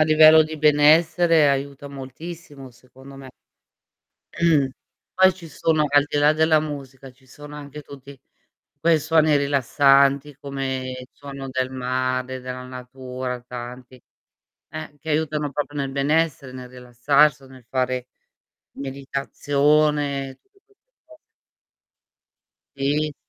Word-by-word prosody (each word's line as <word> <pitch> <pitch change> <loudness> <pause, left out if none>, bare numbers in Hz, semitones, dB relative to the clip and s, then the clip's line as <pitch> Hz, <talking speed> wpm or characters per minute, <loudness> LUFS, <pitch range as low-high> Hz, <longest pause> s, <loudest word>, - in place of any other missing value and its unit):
a - - +6
livello 155 0 +7
di 155 0 -6
benessere 155 +1 +4
aiuta 140 0 -3
moltissimo 140 +1 -10
secondo 130 +3 -16
me. 135 -1 -11 1.0
Mh. 155 -5 +2 0.5
Poi 190 0 +5
ci 170 -3 -13
sono, 155 +1 0
al 145 0 +4
di 145 - -1
là 145 +1 +5
della 160 0 +3
musica, 140 -3 -7
ci 130 +1 -27
sono 145 +3 -12
anche 150 0 -9
tutti 140 -1 -13 0.6
quei 165 -1 +3
suoni 155 0 +3
rilassanti, 140 0 +2
come 135 -2 -4
il 125 - -12
suono 140 -1 -9
del 130 0 -2
mare, 130 0 -2
della 125 0 -7
natura, 125 0 -7
tanti 125 +1 -10 0.7
eh, 155 -2 -8
che 160 - -8
aiutano 150 -1 -1
proprio 145 +1 -4
nel 135 -1 -2
benessere, 140 -1 0
nel 125 -1 -9
rilassarsi 135 +4 +1
o - - -15
nel 130 -1 -16
fare 130 -1 -2 0.7
meditazione, 140 +1 0
e 130 - -12
tutte 395 0 -33
queste 415 +4 -36
cose. 315 -1 -18 1.6
Si, 145 +2 -1
140 Hz, 125 wpm, -22 LUFS, 130-150 Hz, 1.6 s, livello